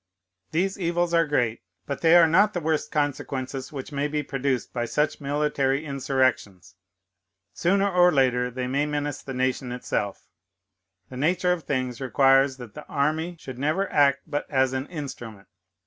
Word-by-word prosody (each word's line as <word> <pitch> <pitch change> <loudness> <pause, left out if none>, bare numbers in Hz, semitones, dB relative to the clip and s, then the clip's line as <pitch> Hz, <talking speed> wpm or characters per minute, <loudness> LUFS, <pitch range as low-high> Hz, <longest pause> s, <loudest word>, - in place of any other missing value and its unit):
"These 190 +5 -1
evils 175 -1 0
are 165 -1 +3
great; 120 -6 0 0.2
but 140 - -5
they 165 0 +6
are 170 -1 +8
not 195 +6 +4
the - - +1
worst 160 -1 -1
consequences 135 -2 -3
which 140 0 -7
may 145 0 -1
be 150 0 -2
produced 135 -2 -2
by 120 -1 -1
such 150 +6 -1
military 145 0 0
insurrections. 130 - -1 0.8
Sooner 195 +3 +2
or 180 -2 +4
later 125 -4 +2
they 125 +1 -4
may 140 +4 0
menace 145 -1 -3
the 135 - -7
nation 130 0 -1
itself. 110 -5 -3 0.9
The 125 - -7
nature 180 +5 +2
of 170 -3 -6
things 130 -2 -2
requires 135 0 +3
that 120 -4 -10
the 150 - -10
army 155 +4 -1
should 130 -4 -9
never 155 +8 0
act 140 -1 +4
but 145 -2 -4
as 130 -2 +2
an 130 +2 -3
instrument. 120 - -8
140 Hz, 165 wpm, -25 LUFS, 130-155 Hz, 0.9 s, are